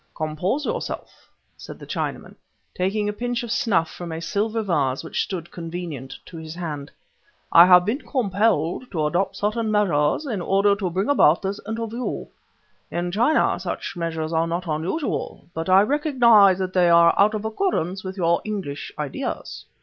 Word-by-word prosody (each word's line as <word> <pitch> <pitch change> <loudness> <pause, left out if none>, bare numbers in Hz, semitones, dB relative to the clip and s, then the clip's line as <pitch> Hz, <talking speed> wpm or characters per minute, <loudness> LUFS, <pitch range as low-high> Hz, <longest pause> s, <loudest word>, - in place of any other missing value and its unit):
"Compose 170 - -2
yourself," 485 +1 -5 0.3
said - - -10
the - - -11
Chinaman, - - -4 0.4
taking 205 +3 -1
a 210 - -1
pinch 245 +2 -3
of 235 - -5
snuff 175 -10 +1
from 170 +1 -8
a 160 - -4
silver 215 +6 -1
vase 145 -9 0
which 160 - -2
stood 175 -3 -5
convenient 165 -6 -6
to 170 - -11
his 160 0 -8
hand. 150 -5 -5 0.6
"I 170 +1 +9
have 180 -1 +7
been 240 +9 -1
compelled 210 - 0
to 155 -3 0
adopt 175 +6 0
certain 215 +2 -1
measures 195 - +1
in 220 -9 -3
order 200 +3 +3
to 190 -3 -2
bring 185 +4 -1
about 205 - +4
this 195 +1 -3
interview. 230 +2 -4 0.6
In 175 +1 -3
China, 240 - +2
such - - -5
measures 165 -1 -3
are 165 +1 +1
not 170 +2 -3
unusual, 170 - -3
but 165 +3 -4
I 190 +1 +7
recognize 235 - +5
that 185 -1 -3
they 180 -2 +4
are 170 0 +6
out 210 +2 +4
of 215 0 -4
accordance 205 - -1
with 190 +1 -6
your 170 -2 +2
English 195 -10 -5
ideas." 150 -3 -5
185 Hz, 165 wpm, -23 LUFS, 165-215 Hz, 0.6 s, I